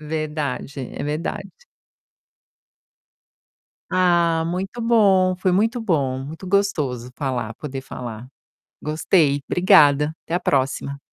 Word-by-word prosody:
Verdade, 150 -3 -4
é - - -5
verdade. 150 +3 -4 2.4
Ah, 170 -3 +3
muito 190 +7 -4
bom. 195 -5 +4
Foi 185 0 0
muito 225 +5 +1
bom, 140 - 0
muito 155 +7 -8
gostoso 145 -11 0
falar 125 -6 -3
poder 135 0 -6
falar. 120 -2 -8 0.5
Gostei, 150 -2 +2
obrigada. 150 -4 +4
Até - - -6
a - - +1
próxima. 140 -2 -1
155 Hz, 100 wpm, -22 LUFS, 135-185 Hz, 2.4 s, bom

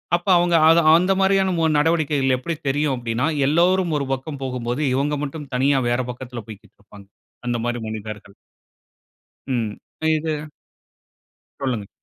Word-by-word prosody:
அப்போ 175 +3 -3
அவுங்க‍ 175 0 +2
அது 165 +1 +6 0.2
அந்த 180 +3 +3
மாரியான 190 -1 +3
மு 165 - +1 0.2
நடவடிக்கைகள், 150 -4 +2
எப்பிடி 165 +6 -4
தெரியும் 145 0 0
அப்படின்னா, 120 +3 -1 0.2
எல்லோரும் 175 +3 +2
ஒரு 140 - -3
பக்கம் 135 +1 -6
போகும்போது, 125 0 -3
இவங்க 145 +2 0
மட்டும் 145 0 -8
தனியா 135 +2 +3
வேற 120 +1 +1
பக்கத்துல, 125 -1 -8
போய்க்கிட்டு 105 -2 -13
இருப்பாங்க. 100 -1 -16 0.4
அந்த 120 0 0
மாரி 120 0 -2
மனிதர்கள். 110 -2 -7 1.1
ம், 120 -5 -1 0.4
இது 155 -1 -3 1.1
சொல்லுங்க. 120 -7 -2
135 Hz, 135 wpm, -22 LUFS, 120-160 Hz, 1.1 s, அது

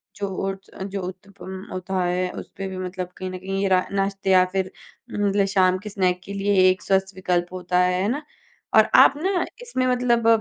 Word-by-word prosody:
जो 200 - -3 0.2
ओट्स 195 0 -6
जो 195 0 -4
उत्तपम 190 0 -9
होता 185 0 -2
है 180 +1 0
उस - - -8
पर 195 0 -3
भी 190 - -6
मतलब 185 0 -4
कहीं 185 - -4
न 185 - -5
कहीं 195 +1 -3
ये 200 - +2
रा 185 -1 +3
नाश्ते 195 0 -1
या 185 -1 +7
फिर 190 -1 -1 0.4
मतलब 200 -1 +1
शाम 185 -1 +4
के 210 - -5
स्नैक 185 -3 0
के 200 - -7
लिए 195 -2 +4
एक 185 0 0
स्वस्थ 190 0 0
विकल्प 180 -1 -1
होता 180 0 0
है, 180 0 +2
है 195 - +1
ना? 290 +5 -2 0.5
और - - +6
आप - - +8
ना 365 +3 0 0.2
इसमें 465 - -1
मतलब 245 -2 +2
190 Hz, 210 wpm, -23 LUFS, 185-200 Hz, 0.5 s, आप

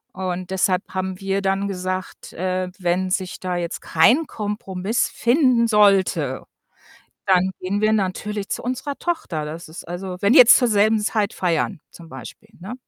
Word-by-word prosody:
Und 185 -1 -4
deshalb 185 0 +1
haben 185 0 -3
wir 195 0 -1
dann 195 +1 0
gesagt, 185 -1 -5
äh, 185 +1 -2
wenn 185 +1 0
sich 185 0 -2
da 180 -1 -3
jetzt 175 -1 -4
kein 245 - +3
Kompromiss 205 -1 -2
finden 245 -2 +2
sollte, 190 - +2 0.8
dann 185 0 +3
gehen 200 +3 -2
wir 215 0 +3
natürlich 205 0 -2
zu - - -3
unserer 270 +3 -4
Tochter. 185 - -3
Das 160 +3 -7
ist 160 - -10
also 180 +1 -6
wenn 200 +3 +3
die - - +8
jetzt 240 -1 +9
zur 245 - +2
selben 215 0 +3
Zeit 210 -1 -1
feiern 170 -3 -1
zum 170 - -14
Beispiel, 215 +5 -11
ne? 195 +7 -7
190 Hz, 165 wpm, -21 LUFS, 180-215 Hz, 0.8 s, jetzt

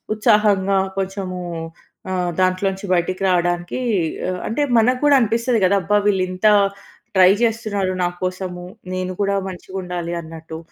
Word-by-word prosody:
ఉత్సాహంగా, 205 -2 +3 0.2
కొంచెము 190 -1 -4 0.7
ఆహ్, 180 -2 -1
దాంట్లోంచి 190 +2 0
బయటికి 185 +2 -1
రావడానికి 175 +2 0 0.5
ఆహ్, 180 0 -3
అంటే, 230 +7 -1 0.2
మనకుడా 255 +5 +3
అనిపిస్తాది 230 +1 +1
కదా! 190 +2 +3
అబ్బా! 210 +4 +2
వీళ్ళింత 185 0 +1 0.7
ట్రై 185 0 +7
చేస్తున్నారు, 215 -4 0
నా 175 - +2
కోసము. 185 -1 -4 0.3
నేను 185 0 -3
కూడా 200 0 +1
మంచిగా 185 +1 -9
ఉండాలి 175 -1 -4
అన్నట్టు. 160 0 -9
185 Hz, 125 wpm, -20 LUFS, 180-205 Hz, 0.7 s, ట్రై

